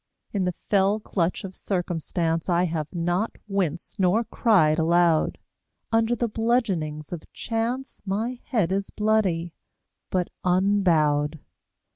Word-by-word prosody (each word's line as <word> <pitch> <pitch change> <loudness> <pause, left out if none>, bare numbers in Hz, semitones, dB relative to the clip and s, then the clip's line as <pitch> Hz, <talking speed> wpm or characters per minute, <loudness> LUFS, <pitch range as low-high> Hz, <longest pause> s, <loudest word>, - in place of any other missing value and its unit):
In 195 -3 0
the 180 - +1
fell 200 +3 +1
clutch 185 -4 -1
of 190 -1 -6
circumstance 170 -2 -2
I 175 0 +3
have 160 -4 -1
not 175 +5 -1
winced 190 -2 -2
nor 190 +5 +3
cried 175 -10 +3
aloud, 170 -1 +3 0.5
Under 225 +1 +3
the 235 0 0
bludgeonings 200 -10 -1
of 165 - -8
chance 240 +3 -3
My 220 +5 -2
head 205 -8 +1
is 195 +1 -1
bloody, 195 -6 +1 0.6
but 180 -2 -1
unbowed. 170 -6 +2
185 Hz, 120 wpm, -25 LUFS, 165-215 Hz, 0.6 s, I